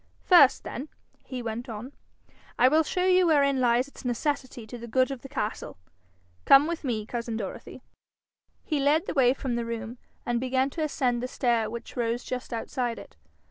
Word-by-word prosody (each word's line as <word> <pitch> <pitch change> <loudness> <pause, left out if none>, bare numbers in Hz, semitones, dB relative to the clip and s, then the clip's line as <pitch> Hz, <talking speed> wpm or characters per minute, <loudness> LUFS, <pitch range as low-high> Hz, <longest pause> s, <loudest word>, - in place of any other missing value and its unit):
'First 290 -8 +6
then,' 280 +5 -6 0.3
he 255 -2 -6
went 235 +2 -5
on, 230 +5 -7 0.6
'I 255 - +6
will 310 +3 +4
show 360 +3 -1
you 370 -1 +4
wherein 280 -4 +3
lies 245 +1 +3
its 280 - -14
necessity 255 -1 -2
to 240 +2 -9
the 235 - -8
good 255 +3 +2
of 265 -3 -6
the 270 - -10
castle. 240 - -4 0.7
Come 275 +1 +7
with 335 0 -4
me, 225 -6 -2
cousin 235 -1 -4
Dorothy.' 200 -4 -7 0.8
He 305 -3 -1
led 295 +5 +2
the - - -3
way 260 -3 +4
from 265 -2 -3
the 235 0 -1
room, 230 +1 -6 0.3
and 240 -1 0
began 260 +2 0
to 325 - -5
ascend 255 -5 0
the 250 - -2
stair 235 -4 0
which 235 +1 -8
rose 235 0 -1
just 250 -1 -5
outside 240 +1 -3
it. - - -12
255 Hz, 185 wpm, -27 LUFS, 235-280 Hz, 0.8 s, Come